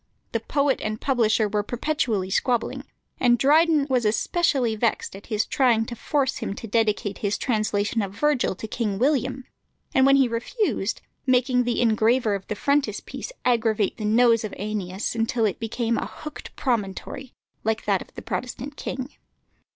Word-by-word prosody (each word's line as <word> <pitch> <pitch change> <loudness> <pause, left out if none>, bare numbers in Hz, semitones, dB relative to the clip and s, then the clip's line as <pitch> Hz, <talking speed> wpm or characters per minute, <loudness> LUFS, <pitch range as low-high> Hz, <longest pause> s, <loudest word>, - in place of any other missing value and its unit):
The 230 - 0
poet 280 +4 0
and 215 0 -3
publisher 225 -5 +2
were 210 0 0
perpetually 230 -5 -1
squabbling, 240 +3 0 0.3
and 240 -1 +4
Dryden 305 +2 +4
was 255 -3 +1
especially 240 - +1
vexed 220 -3 -1
at 195 - -12
his 215 -2 0
trying 240 -5 +2
to 235 - -6
force 270 +2 0
him 195 - -4
to - - -7
dedicate 210 -2 0
his 205 -1 0
translation 215 -2 0
of 195 -2 -3
Virgil 255 0 +1
to 220 - -7
King 215 -3 -2
William, 265 +1 0 0.5
and 265 0 +5
when 275 - +6
he 270 -2 +5
refused, 230 - -1 0.3
making 250 -1 +3
the 240 - 0
engraver 225 0 +3
of 195 -1 -4
the 210 - -3
frontispiece 280 - -1
aggravate 225 -4 +2
the 215 - -4
nose 230 +1 +4
of 215 - -5
Æneas 205 -2 -3 0.2
till 230 -1 +1
it 200 - -1
became 230 0 -1
"a - - -3
hooked 305 -1 -9
promontory," 235 +1 -3 0.3
like 220 +1 -1
that 200 -3 +2
of - - -12
the - - -8
Protestant 255 +3 -5
king. 260 +2 -5
230 Hz, 165 wpm, -24 LUFS, 215-260 Hz, 0.5 s, when